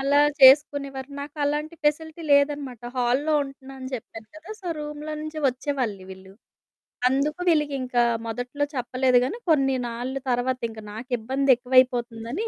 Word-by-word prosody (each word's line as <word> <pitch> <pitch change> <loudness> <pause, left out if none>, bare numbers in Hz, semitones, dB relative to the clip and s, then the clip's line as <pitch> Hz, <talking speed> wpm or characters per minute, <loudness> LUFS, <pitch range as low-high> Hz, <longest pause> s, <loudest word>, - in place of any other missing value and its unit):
అలా 280 +2 +3 0.2
చేసుకునేవారు. 275 0 +5
నాకలాంటి 295 +2 -2
ఫెసిలిటీ 315 +2 -1
లేదనమాట. 280 -4 +1 0.2
హాల్‌లో 255 +5 +1
ఉంటున్నా 270 0 -11
అని 260 - -6
చెప్పాను 225 -2 -9
కదా! 315 +6 -12
సో 365 - -10
రూమ్‌లో 300 +1 -6
నుంచి 310 0 -6
ఒచ్చేవాళ్ళు 250 -6 -3
వీళ్ళు. 190 0 -12 0.8
అందుకు 280 +5 0
వీళ్ళకింకా 275 -6 +1 0.2
మొదట్లో 245 +5 -3
చెప్పలేదు 255 0 +2
గానీ 405 - -3
కొన్ని 270 -4 +3
నాళ్ళు 250 +3 -4
తర్వాత 250 +1 0
ఇంక 220 - -10
నాకిబ్బందెక్కువైపోతుందని, 250 - +1
265 Hz, 120 wpm, -24 LUFS, 245-295 Hz, 0.8 s, చేసుకునేవారు